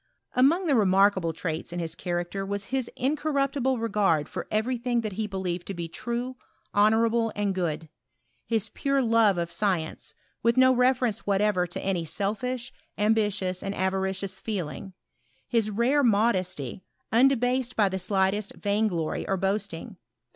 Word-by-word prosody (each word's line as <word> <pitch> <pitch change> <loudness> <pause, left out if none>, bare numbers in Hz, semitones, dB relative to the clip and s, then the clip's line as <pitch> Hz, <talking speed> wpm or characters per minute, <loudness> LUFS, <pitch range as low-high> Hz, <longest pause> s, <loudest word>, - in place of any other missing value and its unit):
Among 300 +9 +4
the 305 - +2
remarkable 195 -5 +4
traits 160 0 -4
in 175 - -5
his 165 -2 -3
character 175 +3 -3
was 200 0 -3
his 260 -3 0
incorruptible 275 -2 0
regard 200 -9 +1
for - - -6
every 220 +4 0
thing 240 -1 0
that 215 -2 -3
he 215 +2 -2
be 195 -2 -5
lieved 180 -2 -3
to 195 - -5
be 170 -1 -4
true, 240 +7 -4 0.4
honourable, 225 +2 +3
and 205 -1 0
good; 165 -3 -2 0.6
his 225 -2 0
pure 275 +3 0
love 225 -4 +4
of 170 0 -2
science, 175 -3 -2 0.3
with 235 +2 +2
no 260 0 +6
reference 250 -4 +1
whatever 200 -2 +2
to 175 - -6
any 185 -3 0
sdfish, 230 +8 -3 0.3
ambitious, 205 -4 +1
and 195 0 -4
avaricious 190 0 -1
feeling; 195 -2 -4 0.5
his 225 -3 +1
rare 240 +7 +2
modesty, 190 - +1 0.3
undebased 250 0 +3
by 210 -2 +4
the 190 0 -2
slightest 195 +2 0
vainglory 200 -6 -1
or 195 - +1
boasting. 195 -2 -2
205 Hz, 145 wpm, -27 LUFS, 185-235 Hz, 0.6 s, no